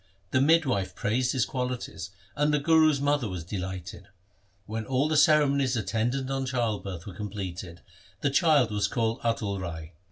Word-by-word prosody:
The 130 - +3
midwife 140 - +2
praised 125 +3 0
his 130 -4 +2
qualities, 125 -7 -4 0.3
and 150 0 +2
the 150 - +3
Guru's 155 0 +4
mother 145 -4 +1
was 90 -3 -5
delighted. 90 -1 -6 0.6
When 110 +2 -4
all 130 +4 +1
the 155 - 0
cere 150 -1 +6
monies 135 -2 +1
attendant 115 +6 -1
on 135 -1 -1
childbirth 105 -8 -2
were 100 - -8
completed, 95 -3 -6 0.4
the 140 - +1
child 145 -6 +4
was 105 -1 +1
called 115 +2 -1
Atal 105 -4 -1
Rai. 80 -2 -6
120 Hz, 160 wpm, -27 LUFS, 100-140 Hz, 0.6 s, cere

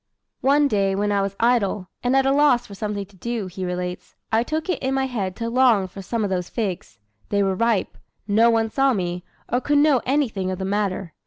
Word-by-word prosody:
"One 285 +3 +4
day 195 -5 +1
when 205 +1 0
I 200 -1 +2
was 195 0 -2
idle, 215 -5 +1
and 250 +2 +1
at 270 0 +4
a 270 - +3
loss 280 -4 +4
for 205 - -11
something 205 0 -4
to 200 +1 -22
do," 230 +2 -3
he 185 +1 -6
relates, 180 0 -4 0.2
"I 225 - +3
took 310 +6 -3
it 365 - -1
in 265 0 0
my 265 0 +1
head 200 -8 -3
to 230 - -4
long 235 -5 +3
for 195 +2 -10
some 220 +4 -2
of 200 - -1
those 180 -1 -2
figs. 200 -7 -4 0.3
They 200 -1 +2
were 195 -1 +1
ripe; 230 +1 0 0.3
no 220 +3 +4
one 225 -1 +1
saw 270 +1 +3
me, 180 -3 -3 0.2
or 245 - 0
could 290 +2 +1
know 290 -4 +4
anything 245 -9 0
of 185 - -3
the 190 - -4
matter. 195 -4 -2
210 Hz, 230 wpm, -23 LUFS, 190-250 Hz, 0.3 s, One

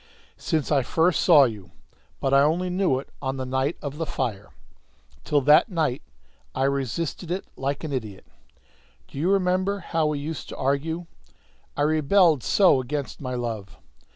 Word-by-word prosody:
"Since 155 -5 -1
I 140 -2 +4
first 165 +7 +1
saw 155 -6 +7
you; 105 -8 -3 0.5
but 135 - 0
I 140 - +6
only 170 +5 +1
knew 180 -7 +1
it 135 - -8
on 135 -1 -3
the 130 - -3
night 130 +4 -1
of 145 +1 -5
the 165 - -2
fire. 110 -7 -3 0.7
Till 145 -2 +1
that 150 - +5
night 155 -8 -1 0.5
I - - 0
resisted 140 +5 -2
it 185 +2 -3
like 140 +3 -3
an 155 -3 -4
idiot. 105 - -5 0.8
Do 140 - -9
you 170 +5 +1
remember 190 +1 +1
how 165 -4 -1
we 150 -1 -1
used 150 +2 -6
to - - -8
argue? 160 +6 -1 0.7
I 145 - +1
rebelled 155 +1 +3
so 135 - +4
against 140 +2 -5
my 125 -2 -4
love! 115 -5 -5
145 Hz, 165 wpm, -24 LUFS, 130-165 Hz, 0.8 s, saw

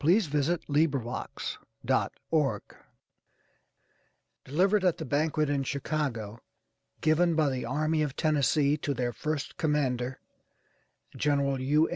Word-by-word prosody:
THE - - 0
BABIES 165 -3 +2
THE 140 -5 -1 0.3
BABIES 140 -10 -1 1.7
DELIVERED 190 +8 +2
AT 180 -3 +3
THE 160 - -5
BANQUET, 150 +2 +1
IN 140 -1 0
CHICAGO, 130 -6 -3 0.6
GIVEN 160 +2 +3
BY 155 -2 +3
THE 130 -1 -3
ARMY 155 +5 0
OF 150 - +1
THE - - -12
TENNESSEE 150 -1 +3
TO 145 -1 -2
THEIR 120 -1 -1
FIRST 155 -2 -3
COMMANDER, 130 -5 0 1.0
GENERAL 140 -2 +1
U. 150 +5 +3
145 Hz, 115 wpm, -29 LUFS, 135-155 Hz, 1.7 s, AT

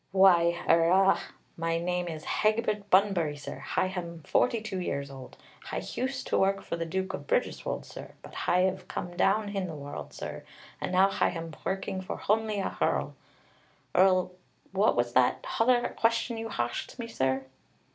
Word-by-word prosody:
"Why, 175 -3 +5
er, 165 0 +5
ah, 195 +1 +5 0.3
my 165 0 0
name 180 +1 -1
is 160 -2 -6
Hegbert 215 -1 0
Bunbury, 185 -6 +3
sir. 145 - -7
Hi - - 0
ham 170 -3 -5
forty 240 -2 +2
two 210 -3 -4
years 140 -5 -3
old. 135 -1 -11 0.3
Hi - - -4
hused 260 +1 -3
to - - +1
work 195 +1 +2
for - - -3
the 165 0 -3
Duke 190 +2 -2
of - - -6
Bridgerswold, - - -1
sir, - - -10
but - - -12
Hi 180 +1 +2
'ave 190 0 -3
come 175 0 -5
down 205 +3 +2
hin 195 -2 -2
the 165 - -6
world, 145 -1 -7
sir, - - -7 0.4
and - - -2
now 185 +1 +5
Hi 195 -1 +2
ham 165 -2 -6
working 190 0 -2
for 190 - -5
honly 215 0 0
a 195 - -1
hearl. - - 0 0.8
Er, 185 0 +5 0.4
what 195 +3 +3
was 120 0 0
that 125 0 +3
hother 240 +1 +2
question 230 +1 +1
you 225 0 -4
harsked 120 - -3
me, 235 - -4
sir?" 130 -9 0
185 Hz, 175 wpm, -29 LUFS, 165-205 Hz, 0.8 s, Why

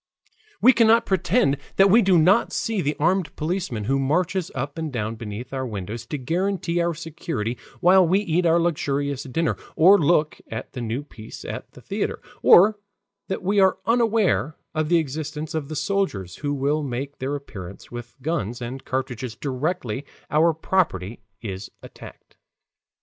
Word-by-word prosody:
We 255 - +8
cannot 230 0 +5
pretend 185 - +2 0.2
that 195 0 +5
we 230 +4 +7
do 190 -3 +4
not 185 +8 +4
see 225 -4 -1
the 150 -1 -1
armed 180 +3 +1
policeman 160 - -2
who 135 +6 +1
marches 175 +6 0
up 140 +4 -4
and 160 -2 -3
down 110 -3 -2
beneath 115 +3 -7
our 130 -1 -2
windows 110 +2 -6
to 150 - -3
guarantee 175 +4 -1
our 170 -1 0
security 160 - -4 0.3
while 185 0 +6
we 185 +4 +3
eat 175 -3 +1
our 165 +1 +4
luxurious 145 -4 -1
dinner, 160 +5 -1 0.2
or 190 +5 +7
look 155 0 +2
at 110 +2 -7
the 125 - -5
new 120 +4 -3
piece 110 -6 -11
at - - -6
the - - -14
theater, - - -3 0.2
or 205 +4 +7 0.5
that 190 - -3
we 200 +2 +2
are 190 -1 +4
unaware 215 - +2 0.2
of 155 -1 -1
the 170 - +5
existence 155 +1 -3
of 155 -3 -2
the 155 - -6
soldiers 145 - -1
who 145 -1 -2
will 145 +2 0
make 140 +1 -4
their 135 +2 -2
appearance 100 -10 -9
with 120 0 -8
guns 130 - -2
and 125 +2 -6
cartridges 125 -3 -3
directly 135 -1 -2 0.3
our 160 +3 +4
property 150 - -1 0.2
is 95 -2 -5
attacked. - - -13
150 Hz, 165 wpm, -24 LUFS, 125-180 Hz, 0.5 s, We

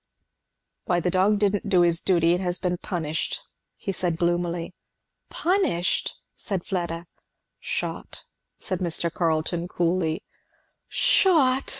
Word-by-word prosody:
"Why 175 -1 +2
the 180 +1 0
dog 195 +3 +3
didn't 205 0 0
do 185 -3 +5
his 170 -1 +3
duty 170 -3 +3
and 180 - 0
has 180 -1 -1
been 180 -2 -2
punished," 160 -5 -2 0.4
he 195 - -4
said 175 -3 -1
gloomily. 175 0 -1 0.6
"Punished?" 350 - +1 0.2
said 195 -5 -3
Fleda. 170 -3 -3 0.5
"Shot," - - -4 0.3
said 185 - -3
Mr. 170 -1 -1
Carleton 165 +1 0
coolly. 170 -2 0 0.6
"Shot!" 275 -8 +4
175 Hz, 115 wpm, -25 LUFS, 170-190 Hz, 0.6 s, do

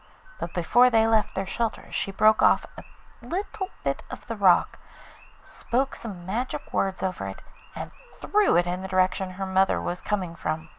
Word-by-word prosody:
But 175 - -5
before 240 +8 +5
they 225 -2 +4
left 220 -2 +2
their 195 - -1
shelter 225 +4 -3
she - - -1
broke 215 +2 +4
off - - +4
a - - -10 0.4
little 380 +1 -4
bit 140 0 -1
of - - -9
the 230 - -4
rock, 190 -4 +3 0.6
spoke 265 +3 -2
some 190 -6 -7
magic 230 +7 -4
words 190 -1 0
over 185 - -2
it, 95 - -8 0.3
and - - -6 0.3
threw 420 0 +2
it 175 - +3
in 180 +1 -3
the 190 - -5
direction 185 0 +1
her 195 +1 -4
mother 190 0 +2
was 175 - -4
coming 185 -5 -2
from. 160 -1 -4
190 Hz, 180 wpm, -26 LUFS, 180-225 Hz, 0.6 s, before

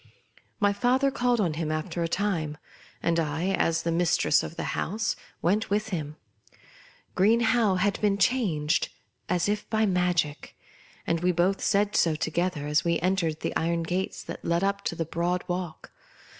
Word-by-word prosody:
My 205 -2 +3
father 255 +6 +2
called 245 -2 +1
on 175 -7 +1
him 155 0 -2
after 155 +2 -3
a 165 - +1
time; 165 -5 -1 0.5
and 170 0 +2
I, 160 +3 -1
as 165 -3 +1
the 170 - 0
mistress 170 -2 +3
of - - -7
the - - -4
house, 215 +4 -1 0.3
went 205 +6 +1
with 210 +2 0
him. 155 -6 -4 1.0
Green 220 +5 +4
Howe 225 -4 +3
had 200 +2 0
been 205 -2 +2
changed, 180 -8 +1 0.4
as 180 0 +1
if 210 0 -2
by 220 0 +2
ma 180 -2 +2
gic, 150 -4 -2 0.5
and 165 - 0
we 180 +2 +2
both 180 +3 +1
said 205 0 +1
so 165 -2 +3
together, 160 0 -1
as 150 +1 +2
we 170 -1 +1
en 185 +2 +2
tered 160 -4 -2
the - - -3
iron 170 0 0
gates 180 +3 -3
that - - -8
led 170 +2 +1
up 200 0 0
the 165 -1 -2
broad 175 +3 -1
walk. 180 -3 -5
180 Hz, 175 wpm, -27 LUFS, 165-205 Hz, 1.0 s, Green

